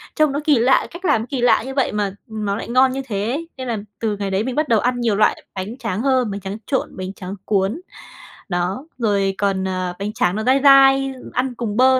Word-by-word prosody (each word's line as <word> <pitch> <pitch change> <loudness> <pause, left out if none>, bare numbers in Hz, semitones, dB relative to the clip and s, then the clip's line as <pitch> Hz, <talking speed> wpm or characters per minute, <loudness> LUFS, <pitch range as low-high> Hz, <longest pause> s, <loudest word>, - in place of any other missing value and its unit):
trông 310 -3 +3
nó 285 - -1
kỳ 295 -6 +4
lạ, 255 +3 +3
cách 355 +3 -9
làm 290 -9 +3
nó - - -5
kỳ 265 -3 -2
lạ 235 -3 +4
như 265 - -5
vậy 270 -2 +1
mà 205 -2 -1 0.2
nó 210 -2 -3
lại 225 - -6
ngon 255 +2 +4
như 270 +1 -3
thế 205 0 -2
ấy! 330 +4 -4
Nên 260 -1 -5
là 230 -2 -1 0.2
từ 215 -3 -1
ngày 200 -1 -3
đấy 195 +3 +1
mình 255 0 -3
bắt 305 0 +1
đầu 225 -2 +4
ăn 245 +2 0
nhiều 225 -4 +1
loại 215 - +2
bánh 200 +7 -5
tráng 225 -4 -3
hơn, 255 -5 +2
bánh 200 - -4
tráng 195 +2 -5
trộn, 270 - -2
bánh 185 +1 -5
tráng 190 0 -7
cuốn, 205 - 0 0.7
đó, 180 +9 -2
rồi 200 -5 +1
còn, 195 -2 0
ờ, 185 -1 -2
bánh 205 +2 -3
tráng 180 -4 +1
nó 220 - -2
dai 260 +3 +4
dai, 270 -1 +6 0.2
ăn 250 0 -1
cùng 225 -2 -3
bơ 260 0 +5
225 Hz, 250 wpm, -20 LUFS, 200-265 Hz, 0.7 s, dai